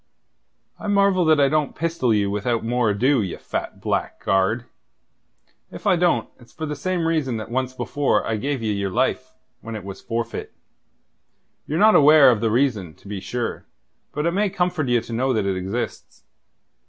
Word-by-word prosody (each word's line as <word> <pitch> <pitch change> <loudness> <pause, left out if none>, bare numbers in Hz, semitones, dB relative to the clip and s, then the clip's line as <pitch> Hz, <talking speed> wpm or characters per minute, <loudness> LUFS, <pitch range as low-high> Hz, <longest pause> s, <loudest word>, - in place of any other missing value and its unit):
"I - - -6
marvel 200 -3 +3
that 155 -1 +4
I 140 - +5
don't 150 0 0
pistol 165 -7 0
you 100 -2 +1
without 115 +3 -1
more 120 -1 +1
ado, 125 +5 +2
ye 95 -4 -4
fat - - -5
blackguard. 95 +5 0 1.0
If - - -11
I 195 -3 +4
don't, 170 -10 +1
it's 120 - -18
for 155 - -5
the 150 -1 -4
same 175 +3 -2
reason 150 -8 0
that 110 +1 -7
once 130 +1 -2
before 145 +2 0
I 115 - -1
gave 135 +2 -2
ye 110 - 0
your 100 -1 -2
life 90 - -1 0.3
when 115 0 -7
it 105 - -6
was 95 0 -8
forfeit. 115 0 -4 1.1
Ye're 155 - -2
not 215 +4 +6
aware 150 -2 +7
of 110 -3 -1
the 115 - +1
reason, 110 - 0
to 100 - -18
be 100 -1 -5
sure; 120 +5 -4 0.4
but 150 +1 -3
it 170 - +2
may 200 +3 +1
comfort 175 -6 -1
ye 120 -1 +3
to 115 - -8
know 130 +3 +1
that 110 -4 0
it 95 -1 0
exists. 95 +6 -5
125 Hz, 185 wpm, -22 LUFS, 110-155 Hz, 1.1 s, aware